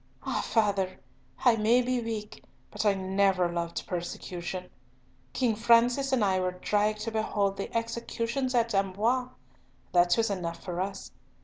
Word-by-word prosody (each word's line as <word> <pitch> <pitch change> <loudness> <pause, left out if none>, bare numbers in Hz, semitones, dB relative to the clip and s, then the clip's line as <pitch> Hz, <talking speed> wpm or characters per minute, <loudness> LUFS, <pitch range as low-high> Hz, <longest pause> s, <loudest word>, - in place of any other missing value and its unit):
"Ah, - - -1
father! 195 -4 0 0.5
I 240 -2 +6
may 230 +4 +4
be 250 0 0
weak, 220 -2 -5 0.3
but 215 - -1
I 200 - +4
never 190 -2 +1
loved 170 -1 -3
persecution. 180 +1 -5 0.6
King 240 -4 +1
Francis 240 +4 +4
and 245 -5 +3
I 190 -1 +2
were 185 0 -1
dragged 210 +1 +1
to 225 +1 -3
behold 205 -2 0
the 195 - -5
executions 235 +3 -2
at 230 -1 +2
Amboise. 210 +6 +1 0.6
That 175 0 +4
was 225 -2 +2
enough 170 -3 -4
for 180 -1 -3
us. 195 +1 -5
210 Hz, 145 wpm, -28 LUFS, 185-230 Hz, 0.6 s, I